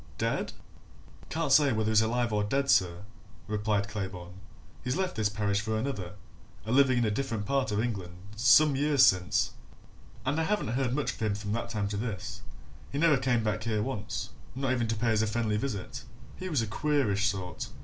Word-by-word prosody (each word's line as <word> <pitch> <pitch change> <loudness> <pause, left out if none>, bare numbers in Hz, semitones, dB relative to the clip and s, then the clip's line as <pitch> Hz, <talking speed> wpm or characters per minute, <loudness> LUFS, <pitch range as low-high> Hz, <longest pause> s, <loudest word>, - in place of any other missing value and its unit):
Dead?" - - -1 0.8
"Can't 160 -2 -1
say 140 0 +6
whether 110 -1 0
he's 110 - +5
dead 110 - +2 0.2
or 105 -1 +1
alive, 140 +7 +1
sir," 90 -3 +2 0.4
replied 105 -1 0
Claybourne. 95 -4 -6 0.5
"He 125 - -4
left 185 +7 -1
this 110 -2 +1
parish 100 -1 0
for 110 0 -1
another 110 -8 -3 0.5
a 110 - -3
living 130 -1 +5
in 120 - +2
a 105 - +1
different 115 -3 -2
part 135 -2 0
of 105 - 0
England 100 -7 -3 0.2
some 135 +6 +6
years 140 -1 +5
since, 90 -2 +2 0.7
and 150 - 0
I 160 - +1
haven't 210 - 0
heard 125 +1 0
much 150 - -1
of - - -14
him 110 -2 0
from 105 0 -5
that 115 +2 -2
time 105 -3 -1
to 100 - -3
this 105 -4 -4 0.5
he 140 - -3
never 160 0 +5
came 125 -3 +1
back 105 0 -1
here 110 -2 0
once, 105 -6 -4 0.2
not 135 0 -1
even 120 -3 0
to 110 - 0
pay 115 +1 +1
us 110 - +2
a 110 - +1
friendly 110 -1 0
visit 105 -6 -4 0.3
he 185 - -6
was 145 -9 +1
a - - -1
queerish 110 -5 +1
sort. 95 -2 -3
110 Hz, 200 wpm, -29 LUFS, 105-135 Hz, 0.8 s, say